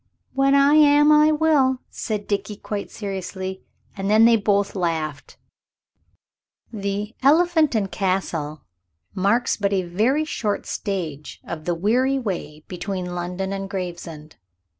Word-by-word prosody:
"When 275 +1 +3
I 280 +1 +5
am, 295 0 +6
I 305 +1 +6
will," 300 -4 +3
said 210 -3 -4
Dickie, 205 0 -2
quite 205 0 -5
seriously. 190 -2 -5 0.3
And 195 0 -3
then 215 +2 +6
they 230 0 +6
both 205 -2 +1
laughed. 160 -5 -3 1.4
The 205 +1 -3
"Elephant 315 0 +4
and 200 -3 0
Castle" 165 -6 -2 0.5
marks 200 +6 +1
but 200 -1 0
a 190 -1 +1
very 225 - +1
short 210 -9 -2
stage 165 -8 -4
of 155 -2 -7
the 175 - 0
weary 250 +9 +1
way 175 - -5
between 180 -1 -4
London 180 +2 -3
and 195 0 -5
Gravesend. 170 -5 -7
200 Hz, 130 wpm, -22 LUFS, 180-255 Hz, 1.4 s, am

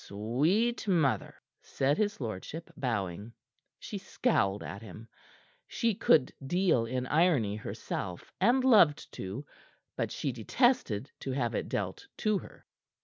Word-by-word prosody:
"Sweet 155 - 0
mother!" 145 - +1 0.3
said 140 +2 0
his 210 -1 0
lordship, 120 - -6
bowing. 105 - -3 0.4
She - - -6
scowled 100 +1 0
at 100 - -7
him. 110 +1 -10 0.6
She 230 -1 0
could 150 -8 +3
deal 160 -5 +2
in 125 +1 -2
irony 145 - +2
herself 90 -4 -5
and 255 +2 +4
loved 205 - +5
to 100 +10 -6 0.5
but - - -2
she 140 - -2
detested 130 - +1
to 135 - -4
have 120 -3 -1
it - - -2
dealt 405 0 -3
to 215 -3 +1
her. - - -14
135 Hz, 130 wpm, -30 LUFS, -, 0.6 s, loved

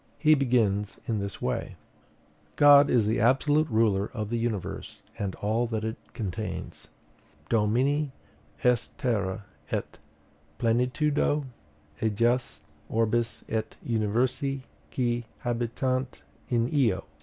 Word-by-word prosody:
He 155 +1 +5
begins 115 -8 +1
in 110 -3 0
this 100 -1 -5
way: - - -2 0.8
"God 145 0 +7
is 115 -4 +3
the 110 +2 +1
absolute 145 +6 +3
ruler 110 -4 +2
of 105 -2 -3
the 120 - 0
universe 115 -5 -4 0.2
and 100 -2 -2
all 110 +4 0
that 110 -2 -2
it 110 0 -2 0.2
contains: 95 -8 -5 0.6
Domini 130 +7 +2 0.5
est 125 -2 +1
terra 100 -5 -1 0.2
et - - -3 0.6
plenitudo 140 +5 +1 0.6
ejus, 115 - +1 0.3
orbis 115 +1 0
et 110 0 -3
universi 120 +5 0 0.3
qui 120 -2 0 0.2
habitant 125 +2 -1 0.3
in 120 -1 +2
eo. 115 -10 +2
120 Hz, 110 wpm, -27 LUFS, 110-130 Hz, 0.8 s, God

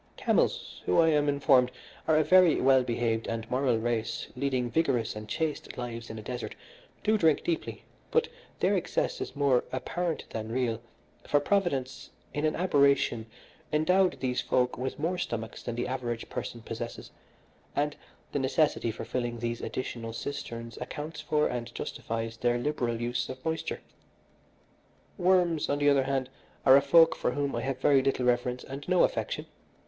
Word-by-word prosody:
Camels, - - 0
who, 90 - +4
I 165 -1 +6
am 150 -2 +3
informed, 135 -3 +4 0.4
are 160 -1 +4
a 155 - +4
very 185 -1 +6
well 130 0 +5
behaved 115 -2 -1
and 115 -1 -3
moral 125 -2 +2
race 120 +6 -2
leading 125 -2 -1
rigorous 135 -10 +1
and 105 0 -8
chaste 160 +3 -3
lives 115 -2 -5
in 110 - -6
a 110 - -7
desert, 125 +1 -5 0.5
do 215 0 +3
drink 160 -4 +3
deeply, 170 -2 -3 0.3
but 470 0 +2 0.3
their - - +3
excess - - -1
is - - -5
more 140 -3 +3
apparent 165 +6 -2
than 110 0 -4
real, 120 -2 0 0.5
for 145 - +4
Providence 145 -6 -1 0.2
in 145 +1 -1
an 155 - +1
aberration 140 -9 +2 0.4
endowed 180 +5 +3
these 125 -1 0
folk 125 -1 +1
with 130 +1 -4
more 175 +4 -1
stomachs 110 -6 -4
than 120 - -4
the 120 +1 -2
average 120 -3 -3
person 115 -1 -5
possesses, 115 +1 -6 0.6
and 145 0 0 0.4
the 145 - 0
necessity 140 -2 +1
for 110 - -5
filling 120 -2 -2
these 115 0 -3
additional 115 -3 -4
cisterns 115 -2 -6
accounts 150 +5 -5
for 150 -1 +1
and 120 -1 -3
justifies 115 0 -4
their 120 +1 +1
liberal 120 -3 -1
use 120 +1 -2
of 130 0 -8
moisture. 160 0 -2 1.4
Worms, 175 -3 +3
on 145 - +1
the 145 0 +4
other 135 -1 +3
hand, 135 -1 0 0.4
are 130 - +9
a 140 - +7
folk 165 +4 +6
for - - -1
whom 140 -1 -1
I - - -1
have 135 -1 -2
very 135 0 +5
little 130 -1 0
reverence 125 0 +1
and 135 +2 -7
no 180 -1 +5
affection. - - -1
130 Hz, 165 wpm, -29 LUFS, 120-150 Hz, 1.4 s, are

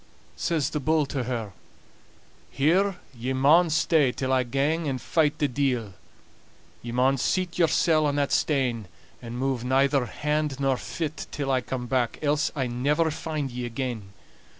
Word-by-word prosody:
Says 160 -6 -1
the 150 - -1
bull 155 +1 +2
to 135 -2 -3
her: 115 -5 -4 1.0
"Here 180 +8 +2 0.2
ye 125 +3 -3
maun 155 +6 +5
stay 155 -3 +3
till 130 +1 -2
I 130 - +4
gang 140 +6 0
and 130 -2 -2
fight 150 +3 +1
the 145 - +1
deil. 125 -6 -1 0.9
Ye 120 - -6
maun 130 +2 +2
seat 180 +5 -1
yoursel' 160 -2 +3
on 145 - 0
that 145 -1 0
stane, 125 -8 0 0.3
and 120 0 -7
move 130 -2 -1
neither 135 0 +2
hand 150 -1 -2
nor 135 -1 +2
fit 155 +2 -5
till 140 -2 -3
I 130 -1 +2
come 125 0 -4
back, 120 -1 0
else 145 0 +1
I'll 135 -3 -1
never 145 +7 +1
find 155 -3 -4
ye 125 0 -5
again. 120 -4 -4
135 Hz, 160 wpm, -26 LUFS, 125-150 Hz, 1.0 s, maun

